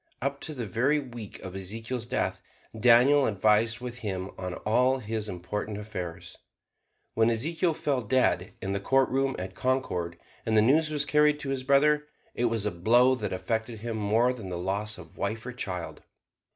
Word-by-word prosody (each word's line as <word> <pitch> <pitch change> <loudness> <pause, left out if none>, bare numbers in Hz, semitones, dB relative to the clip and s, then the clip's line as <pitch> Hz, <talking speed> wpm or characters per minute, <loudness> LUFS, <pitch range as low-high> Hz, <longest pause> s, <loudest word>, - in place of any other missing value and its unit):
Up 140 +1 -2
to 155 - -5
the 120 -3 -3
very 125 +9 +1
week 120 -6 -8
of 95 0 -8
Ezekiel's 115 +5 -4
death - - -1 0.3
Daniel 125 +5 +5
advised 110 +3 +2
with 125 -1 -6
him 95 -4 -4
on 90 -1 -5
all 125 +5 +3
his 110 -3 -3
important 100 +4 -4
affairs. 90 -5 -7 0.7
When 115 +1 +3
Ezekiel 160 +8 0
fell 140 -4 0
dead 130 +4 +1
in 95 - -2
the 100 - -1
courtroom 135 +4 +2
at 95 +1 -5
Concord 90 -10 -1 0.3
and 110 -1 +1
the - - +7
news 155 +6 +4
was 150 -1 0
carried 150 +1 +3
to 140 - -4
his 135 -1 -1
brother, 150 +3 +3 0.3
it 120 - 0
was 115 -3 0
a 105 - 0
blow 120 +9 +4
that 105 -6 -3
affected 110 +3 -3
him 115 0 -3
more 110 +4 +2
than 110 -7 -8
the 90 - -3
loss 100 +4 -2
of 85 -3 -13
wife 110 +3 -2
or 125 - -5
child. 90 -8 -5
115 Hz, 180 wpm, -28 LUFS, 100-130 Hz, 0.7 s, the